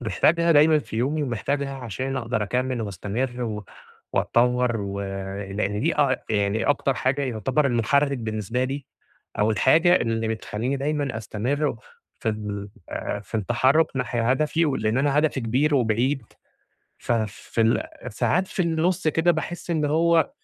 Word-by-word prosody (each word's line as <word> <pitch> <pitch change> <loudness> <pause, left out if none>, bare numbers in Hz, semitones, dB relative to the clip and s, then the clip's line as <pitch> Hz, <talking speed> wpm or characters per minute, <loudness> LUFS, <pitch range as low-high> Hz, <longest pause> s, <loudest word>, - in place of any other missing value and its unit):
محتاجها 170 +8 +3
دايمًا 155 +1 +6
في 110 - -7
يومي 145 +6 0
ومحتاجها 140 +2 -2
عشان 130 +2 -4
أقدر 115 -3 -1
أكَمّل 125 +4 -1
وأستمر 110 +6 -3
و 105 -3 -4 0.5
وأتطوّر 125 0 +2
و 100 0 -4 0.5
لإن 105 +1 -1
دي 155 +3 0
أع 135 -3 +3
يعني 105 +1 +1
أكتر 140 -1 +1
حاجة 135 +3 0
يعتبر 130 +4 0
المحرِّك 140 +3 +2
بالنسبة 110 +2 -2
لي، 135 +1 -4 0.5
أو 105 +2 +3
الحاجة 160 - +5
اللي 115 -4 -1
بتخلّيني 110 +4 -2
دايمًا 140 -3 -1
أستمر 125 +7 -1 0.4
في - - -1
ال 105 -2 -4 0.2
آآ 105 - -3
في 100 +2 -15
التحرُّك 130 +9 +3
ناحية 120 -2 0
هدفي، 155 +4 +2
و 135 - 0
لإن 110 +2 0
أنا 145 +1 +2
هدفي 150 -3 +1
كبير 130 +6 +1
وبعيد 125 +2 +1 0.8
ففي 110 -1 -2
ال 115 +1 0
ساعات 180 - +1
في 185 - -1
النُص 165 0 +1
كده 165 +3 +3
باحس 175 +2 -4
إن 155 -3 +1
هو 165 +2 +3
130 Hz, 145 wpm, -24 LUFS, 110-145 Hz, 0.8 s, دايمًا